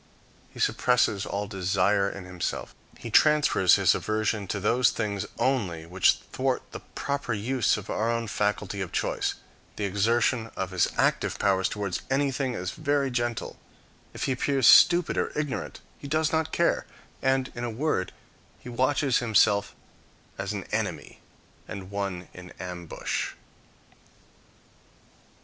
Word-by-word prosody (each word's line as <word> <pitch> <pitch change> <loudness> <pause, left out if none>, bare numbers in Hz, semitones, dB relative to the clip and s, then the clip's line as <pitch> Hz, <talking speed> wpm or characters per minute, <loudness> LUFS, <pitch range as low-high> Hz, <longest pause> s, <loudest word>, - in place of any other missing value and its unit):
He - - -14
suppresses 120 -5 +2
all 100 +1 -2
desire 100 0 +1
in 100 -2 -8
himself; 90 -1 -4 0.2
he 115 - -8
transfers 150 - +5
his 95 -4 +4
aversion 110 -1 -1
to 100 - -2
those 120 +5 +3
things 100 -3 -3
only 95 -12 0
which 90 +2 +3 0.2
thwart 130 -1 0
the - - -6
proper 140 -4 -4
use 115 +4 +1
of 105 -1 -8
our 110 +2 -1
own 115 0 -1
faculty 105 -2 -1
of 95 - -4
choice; - - -1 0.4
the 105 - -4
exertion 115 +4 +1
of 95 0 -3
his 90 -1 +2
active - - +1
powers 95 -1 +2
towards 100 -3 -3
anything 135 -2 0
is 90 0 -3
very 145 -3 0
gentle; 120 -2 -3 0.5
if - - -6
he - - 0
appears 135 0 +1
stupid 175 +8 +6
or - - -2
ignorant, 150 -3 -3 0.2
he 140 - -8
does 155 +2 +1
not 160 0 0
care, 170 - +1 0.3
and, 130 0 +1
in 120 - -6
a 120 - -2
word, 115 -5 -1 0.5
he - - -11
watches 130 +2 +1
himself 105 -3 +2 0.6
as - - -4
an - - -4
enemy, - - -3 0.5
and 95 0 -8
one 100 -3 -3
in 90 0 -11
ambush. 90 -2 -4
110 Hz, 140 wpm, -27 LUFS, 95-130 Hz, 0.6 s, stupid